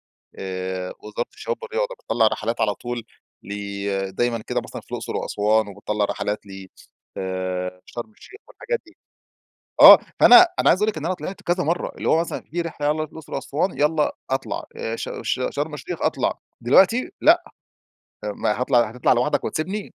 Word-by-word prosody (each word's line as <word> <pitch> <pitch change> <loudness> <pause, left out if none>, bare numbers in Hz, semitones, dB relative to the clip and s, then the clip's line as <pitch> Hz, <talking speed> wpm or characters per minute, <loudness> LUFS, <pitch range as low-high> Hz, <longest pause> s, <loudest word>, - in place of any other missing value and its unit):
آآ 95 -1 -6
وزارة 105 +3 -5
الشباب 475 - -4
والرياضة - - -2
بتطلّع 115 - +2
رحلات 115 +2 -2
على 105 - +2
طول 120 -1 -5 0.4
ل 100 -1 -3
دايمًا 115 +3 -1
كده - - -1
مثلًا - - -8
في - - -25
الأقصر - - -4
وأسوان 105 +1 +1
وبتطلّع 105 +1 -2
رحلات 105 +1 -3
ل 95 -1 -10 0.5
آآ 95 -1 -3
شرم 120 -2 -7
الشيخ 405 - -15
والحاجات 480 -1 -4
دي. 335 0 -20 0.8
آه، - - +12 0.2
فأنا 365 0 +10
أنا - - +3
عايز 185 - +3
أقول 215 - +3
لِك 205 - -7
إن 150 - -7
أنا 185 - 0
طلِعت 185 +1 -7
كذا 175 +1 0
مرّة، 165 +4 -1
اللي - - -3
هو 160 - +4
مثلًا 170 - -4
في 175 +3 -2
رحلة 160 -3 -3
يالّا 150 - +3
نروح 155 -1 -3
الأقصر 160 -3 -12
وأسوان 155 +7 -2
يالّا 150 0 +2 0.2
أطلع 135 0 -2
آآ 115 +1 -3
ش - - -5
ش 115 +3 -1
شرم 150 +1 -3
الشيخ 135 - -6
أطلع. - - 0 0.2
دلوقتي 190 - +4
لأ، 345 +3 +5 0.8
ما 105 +2 -1
هاطلع 125 -3 +3
هتطلع 125 +1 +2
لوحدك 125 +5 +1
وتسيبني؟! 190 +6 -3
120 Hz, 175 wpm, -23 LUFS, 105-170 Hz, 0.8 s, آه